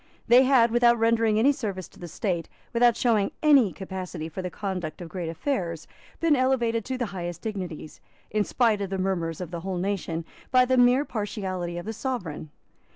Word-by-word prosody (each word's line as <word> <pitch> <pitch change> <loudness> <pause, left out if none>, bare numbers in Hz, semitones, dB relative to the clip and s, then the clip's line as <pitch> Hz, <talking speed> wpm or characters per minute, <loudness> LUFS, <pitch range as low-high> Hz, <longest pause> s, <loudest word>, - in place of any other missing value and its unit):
They 245 +2 +7
had, 250 -4 +5
without 240 0 +4
rendering 225 -1 +2
any 255 +6 +5
service 200 - -4
to - - -19
the 175 - -7
State, 170 -1 -3 0.2
without 235 -1 +4
showing 220 -5 +2
any 275 -10 +6
capacity 185 -4 -6
for 175 +4 -5
the 180 - -4
conduct 180 -5 -4
of 175 -2 -8
great 170 0 -4
affairs, 170 - -3 0.3
been 330 -3 +3
elevated 240 -4 +1
to 260 0 -3
the 245 - -1
highest 175 -2 -5
dignities, 185 -8 -6 0.3
in 215 0 +2
spite 220 -2 +1
of 195 - -3
the 195 - -2
murmurs 175 -4 -1
of 180 -2 -6
the 170 - -4
whole 185 +1 -4
nation, 175 -3 -2 0.2
by 255 -1 +5
the 260 +1 +2
mere 250 +3 +5
partiality 190 -6 -4
of 175 - -6
the 220 - -4
Sovereign. 205 - -4
200 Hz, 190 wpm, -26 LUFS, 175-240 Hz, 0.3 s, They